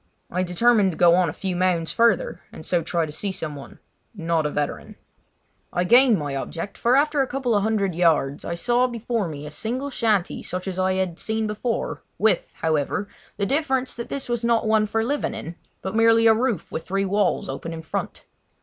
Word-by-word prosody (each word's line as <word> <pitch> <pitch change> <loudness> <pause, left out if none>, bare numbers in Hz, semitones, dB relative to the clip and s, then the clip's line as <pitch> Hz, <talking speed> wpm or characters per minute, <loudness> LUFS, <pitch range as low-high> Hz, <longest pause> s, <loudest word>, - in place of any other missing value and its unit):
I 180 - 0
determined 195 +2 +3
to - - -9
go 175 -1 +6
on 180 -1 +3
a - - -2
few 185 +3 -4
mounds 175 -2 +1
further 230 -4 +2
and 155 - -10
so 175 -2 +1
try 165 0 -1
to 150 - -8
see 195 +6 -3
someone—not 165 +1 -4
a - - -2
veteran. 145 0 -3 0.8
I 175 - 0
gained 240 +3 +6
my 145 -3 -3
object, 165 +7 -5
for 240 +2 +2
after 295 +1 +2
going 270 - +2
a - - -21
couple 255 -2 -1
of 205 - +3
hundred 200 -3 0
yards 160 -4 +2
I 170 - -3
saw 245 +7 +2
before 235 -3 -2
me 150 -2 -7
a 150 - -7
single 250 - -3
shanty 215 -7 0
such 180 +1 -5
as 185 -1 -3
I 185 0 +2
had 185 -3 -2
seen 220 0 -1
before—with, 215 -2 -1
however, 160 +6 0 0.3
the 200 - 0
difference 265 0 0
that 235 - -7
this 275 - -3
was 240 -1 -2
not 235 -1 +2
one 215 -1 +3
for 225 +2 0
living 275 -2 -1
in, 170 -6 -6 0.3
but 190 +2 -4
merely 225 0 +5
a 225 - +7
roof 230 -5 -1
with 160 - -4
three 195 +1 0
walls 200 0 +1
open 165 - -5
in 160 -1 -7
front. 160 - -5
200 Hz, 205 wpm, -23 LUFS, 170-230 Hz, 0.8 s, a